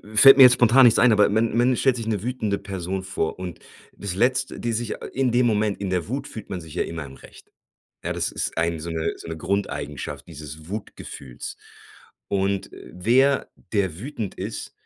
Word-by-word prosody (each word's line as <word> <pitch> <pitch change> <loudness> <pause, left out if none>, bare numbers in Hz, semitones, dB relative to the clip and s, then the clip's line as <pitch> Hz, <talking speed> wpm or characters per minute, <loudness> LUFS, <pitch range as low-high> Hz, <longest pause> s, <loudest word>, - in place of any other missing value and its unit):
fällt 135 +4 +9
mir 135 - +10
jetzt 125 -1 +9
spontan 125 +2 +6
nichts 115 -2 +6
ein, 125 - +6
aber 105 -1 +5
man 110 +2 +1
man 125 +2 +3
stellt 130 -2 +3
sich 115 -2 -5
'ne 105 -3 -1
wütende 110 -5 -1
Person 95 -1 -4
vor 95 -4 -2
und 90 -3 -6 0.4
das 100 -3 -5
Letzt 130 +5 +1
die 120 - -2
sich 115 0 -2 0.2
in 130 -1 +1
dem 120 +1 +3
Moment 105 -3 +1
in 100 -1 -3
der 90 -2 -1
Wut 130 +6 -4
fühlt 110 - -9
man 95 - -4
sich 80 -2 -12
ja 90 - 0
immer 80 -3 -6
im 70 - -11
Recht. - - -16 0.5
Ja, - - -2
das - - -2
ist - - -3
ein 85 0 0
so 85 +2 -6
'ne 80 -1 -2
so - - -11
'ne 80 -1 -5
Grundeigenschaft 75 -6 -3
dieses 75 0 -10
Wutgefühls. 70 - -7 0.7
Und 100 0 0
wer, 125 +10 +1 0.2
der 95 -5 0
wütend 115 -6 -5
ist - - -6
100 Hz, 200 wpm, -24 LUFS, 85-120 Hz, 0.7 s, mir